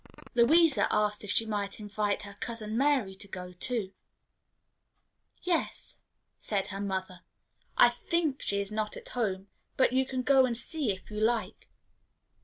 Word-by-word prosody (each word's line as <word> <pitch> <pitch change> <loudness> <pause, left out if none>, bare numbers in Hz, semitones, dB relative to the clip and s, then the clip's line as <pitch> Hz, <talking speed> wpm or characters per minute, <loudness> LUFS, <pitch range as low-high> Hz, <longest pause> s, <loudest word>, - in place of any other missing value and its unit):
Louisa 295 +6 +5
asked 210 0 +1
if 205 - -8
she 225 - +2
might 205 -2 -3
invite 210 -1 -1
her 200 -1 -9
Cousin 220 -2 -4
Mary 265 -6 +2
to 195 +1 -9
go 180 -2 -7
too. 200 +1 -2 1.5
"Yes," 350 -2 -1 0.4
said 200 -3 -1
her 195 - -4
mother; 190 -2 -3 0.6
"I - - +8
think 325 -6 -1
she 200 - 0
is 200 +1 -3
not 215 0 -2
at - - -10
home; 195 -5 -2 0.3
but 260 - +4
you 260 0 +2
can 260 -1 -2
go 265 -1 +5
and 235 -2 -1
see, 295 0 -2
if 190 +2 -8
you 210 - -4
like." 230 +1 -1
215 Hz, 155 wpm, -30 LUFS, 200-260 Hz, 1.5 s, I